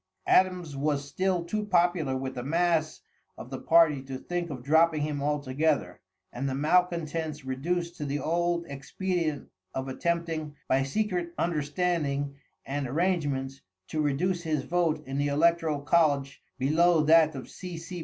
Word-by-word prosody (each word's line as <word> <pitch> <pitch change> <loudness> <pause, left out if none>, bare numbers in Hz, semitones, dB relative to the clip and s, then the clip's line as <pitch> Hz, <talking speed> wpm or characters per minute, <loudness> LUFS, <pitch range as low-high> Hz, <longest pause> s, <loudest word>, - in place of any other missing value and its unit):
Adams 180 -5 +2
was 145 0 -1
still 180 +3 0
too 210 +5 -2
popular 175 -8 +2
with 130 0 -4
the 125 - -5
mass 165 +2 0 0.4
of 125 - -10
the 130 - -4
party 160 -4 +4
to 135 0 -6
think 175 +4 -3
of 130 -4 -6
dropping 160 +2 +3
him 150 -2 -2
altogether, 145 +1 0 0.3
and 135 +3 -2
the 130 - -2
malcontents 160 -1 0
reduced 170 +6 -2
to 150 - -4
the 145 0 -2
old 170 +2 0
expedient 155 +2 -3 0.3
of 130 0 -3
attempting, 160 +1 -2
by 130 +1 +3
secret 175 +3 -2
understanding 150 -3 -1 0.3
and 140 0 -2
arrangements, 140 -4 -1 0.3
to 155 - -2
reduce 170 +5 0
his 155 -4 -1
vote 165 -2 0
in 135 +1 -3
the 145 - +1
electoral 160 0 +2
college 140 -2 +2 0.2
below 155 +4 +3
that 160 0 +5
of 130 - -7
C. 180 -2 -8
C. 165 +2 -7
155 Hz, 150 wpm, -28 LUFS, 140-170 Hz, 0.4 s, that